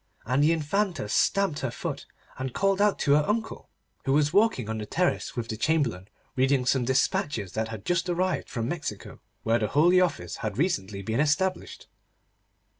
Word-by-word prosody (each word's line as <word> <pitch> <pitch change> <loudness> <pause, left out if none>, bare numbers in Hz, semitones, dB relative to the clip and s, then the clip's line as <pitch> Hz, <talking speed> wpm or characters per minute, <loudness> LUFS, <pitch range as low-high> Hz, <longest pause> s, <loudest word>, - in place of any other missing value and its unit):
And 130 +5 +2
the 155 - +4
Infanta 165 - -1
stamped 195 - +1
her 130 - -2
foot, - - -5 0.3
and 130 -2 -4
called 195 0 +2
out 205 -1 +3
to 140 - +3
her 150 - +5
uncle, 220 +2 -3 0.4
who 135 - +2
was 145 +1 +2
walking 200 - +3
on 110 0 -3
the 105 - -4
terrace 180 - -1
with 120 -3 -3
the 110 - -4
Chamberlain, 120 - 0 0.3
reading 130 0 +2
some 125 -1 +2
despatches 130 -5 0
that 110 +2 -2
had 110 -3 -8
just 175 0 0
arrived 185 +2 -1
from 115 -1 -3
Mexico, 145 - -5 0.2
where 115 +1 +2
the 105 - 0
Holy 175 - +4
Office 90 - -1
had 105 -1 -4
recently 100 - -1
been 110 +5 -1
established. 170 +6 0
140 Hz, 180 wpm, -27 LUFS, 115-175 Hz, 0.4 s, her